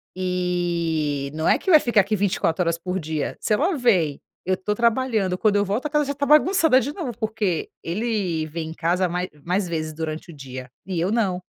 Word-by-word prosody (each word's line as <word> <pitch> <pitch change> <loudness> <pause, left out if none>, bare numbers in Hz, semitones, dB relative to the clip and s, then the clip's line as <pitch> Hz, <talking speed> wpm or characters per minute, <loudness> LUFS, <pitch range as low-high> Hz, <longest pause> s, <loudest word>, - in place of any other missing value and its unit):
e 170 -6 -1
não 160 - -1
é - - +4
que - - -4
vai 315 -4 +8
ficar 235 -6 +3
aqui 200 +3 -1
24 185 -3 +1
horas 170 0 0
por 180 +2 -3
dia, 155 -2 -3
se - - 0
ela 315 - +1
veio, 180 - +2 0.3
eu 185 +1 +1
tô 210 +3 -1
trabalhando, 225 -4 +1
quando 205 +1 +3
eu 205 - +2
volto, 210 +9 -2
a - - -9
casa 295 0 +1
já 285 - -2
está 285 +1 -2
bagunçada 305 -1 +5
de 285 - -3
novo, 295 -10 -4
porque 215 -6 -1
ele 185 -4 -1
vem 160 0 -5
em - - -6
casa, 175 +3 +1
ma 175 +1 -2 0.3
mais 180 +2 0
vezes 155 -2 -3
durante 160 +2 -5
o 155 - -13
dia, 130 -2 -8 0.2
e 185 -3 -3
eu 180 +4 0
não, 195 -6 0
185 Hz, 215 wpm, -23 LUFS, 165-230 Hz, 0.3 s, vai